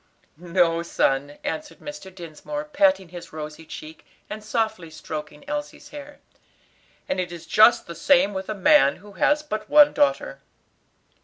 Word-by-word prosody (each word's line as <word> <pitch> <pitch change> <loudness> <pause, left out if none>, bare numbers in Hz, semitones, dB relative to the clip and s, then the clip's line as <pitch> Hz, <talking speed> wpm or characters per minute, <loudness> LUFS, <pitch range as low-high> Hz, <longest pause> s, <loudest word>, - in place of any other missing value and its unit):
"No, 170 -1 +1
son," 145 -3 0
answered 305 -1 -5
Mr. 295 -10 -9
Dinsmore, 185 - -7
patting 290 - +2
his 175 0 -10
rosy 155 +1 -8
cheek, 155 +1 -10 0.3
and 215 0 -6
softly 220 -6 -2
stroking 155 - -8
Elsie's 295 0 -6
hair, 290 0 -10 0.9
"and 280 - -2
it 180 -1 -3
is 170 -1 -9
just 220 +7 +5
the 170 - -8
same 260 - +3
with 190 0 -5
a 215 - -2
man 205 - +5
who 205 +2 -15
has 295 +10 +1
but 215 -7 -5
one 295 0 +7
daughter." - - 0
205 Hz, 150 wpm, -24 LUFS, -, 0.9 s, one